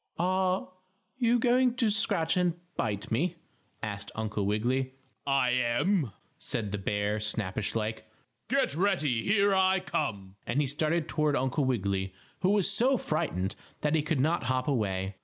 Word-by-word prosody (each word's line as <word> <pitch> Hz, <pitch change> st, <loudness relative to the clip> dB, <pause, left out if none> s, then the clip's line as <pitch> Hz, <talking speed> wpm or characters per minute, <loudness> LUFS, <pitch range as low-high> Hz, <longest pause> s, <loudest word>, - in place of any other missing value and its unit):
"Are 185 Hz, +1 st, +1 dB
are -, -, -12 dB, 0.5 s
you 240 Hz, -1 st, +4 dB
going 250 Hz, +1 st, +3 dB
to 230 Hz, -4 st, +2 dB
scratch 165 Hz, -6 st, +1 dB
and 180 Hz, -2 st, +2 dB, 0.2 s
bite 105 Hz, -3 st, -2 dB
me?" 165 Hz, +10 st, +1 dB, 0.5 s
asked 100 Hz, -1 st, -4 dB
Uncle 105 Hz, -2 st, -2 dB
Wiggily. 130 Hz, +5 st, 0 dB, 0.3 s
"I 135 Hz, -3 st, +3 dB
am," 125 Hz, -, +1 dB, 0.3 s
said 110 Hz, -5 st, -3 dB
the 105 Hz, -, -2 dB
bear, 105 Hz, +2 st, -1 dB
snappish 105 Hz, -1 st, -2 dB
like. 110 Hz, 0 st, -3 dB, 0.4 s
"Get 275 Hz, -, +2 dB
ready. 155 Hz, -, +1 dB
Here 200 Hz, -, +3 dB
I 190 Hz, 0 st, +4 dB
come!" 100 Hz, -, -3 dB
and 125 Hz, -, 0 dB
he 150 Hz, -, +3 dB
started 155 Hz, +4 st, 0 dB
toward 150 Hz, -2 st, +1 dB
Uncle 135 Hz, +1 st, +1 dB
Wiggily, 100 Hz, -6 st, -1 dB, 0.2 s
who 185 Hz, -, +2 dB
was 200 Hz, -2 st, +3 dB
so 240 Hz, +7 st, +3 dB
frightened 155 Hz, -, -1 dB, 0.3 s
that 150 Hz, 0 st, +1 dB
he 160 Hz, -, +3 dB
could 150 Hz, -1 st, -1 dB
not 160 Hz, +6 st, +1 dB
hop 130 Hz, 0 st, 0 dB
away. 95 Hz, -7 st, -1 dB
135 Hz, 160 wpm, -29 LUFS, -, 0.5 s, you